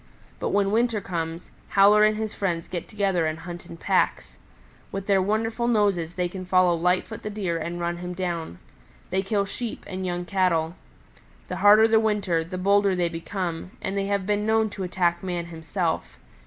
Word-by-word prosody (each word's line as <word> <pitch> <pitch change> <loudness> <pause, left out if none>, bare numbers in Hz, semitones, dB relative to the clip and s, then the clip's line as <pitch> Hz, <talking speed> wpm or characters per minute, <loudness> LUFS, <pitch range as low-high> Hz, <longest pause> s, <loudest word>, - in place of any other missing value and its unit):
But - - -1
when 200 -1 +2
winter 230 0 +2
comes, 165 -3 -5 0.2
Howler 205 +2 +6
and 215 0 +4
his 220 -1 -3
friends 170 -4 -2
get 175 -2 -5
together 195 -6 0
and 155 0 -2
hunt 175 +1 -8
in 165 - -9
packs. - - 0 0.5
With 195 0 -4
their 195 -1 +3
wonderful 225 +4 0
noses 200 -7 +1
they 180 -1 0
can 185 +1 -7
follow 185 -1 +4
Lightfoot 180 +6 0
the 215 - -4
Deer 190 -6 -2
and 170 +2 -4
run 170 0 -2
him 180 +1 -5
down. 170 - -3 0.5
They 190 - +2
kill 200 +1 0
Sheep 230 +3 -5
and 190 0 -5
young 175 -1 -2
Cattle. 175 -4 +1 0.8
The - - -3
harder 210 +2 +7
the 220 0 +4
winter 205 -7 +1
the 180 +3 -6
bolder 200 +1 +3
they 175 -1 +1
become, 170 +1 -5
and 190 - -3
they 195 0 -1
have 200 -1 0
been 210 +1 0
known 220 0 +2
to 200 - -7
attack 175 -2 0
man 175 -2 -3
himself. 165 +1 -2
185 Hz, 185 wpm, -25 LUFS, 175-205 Hz, 0.8 s, harder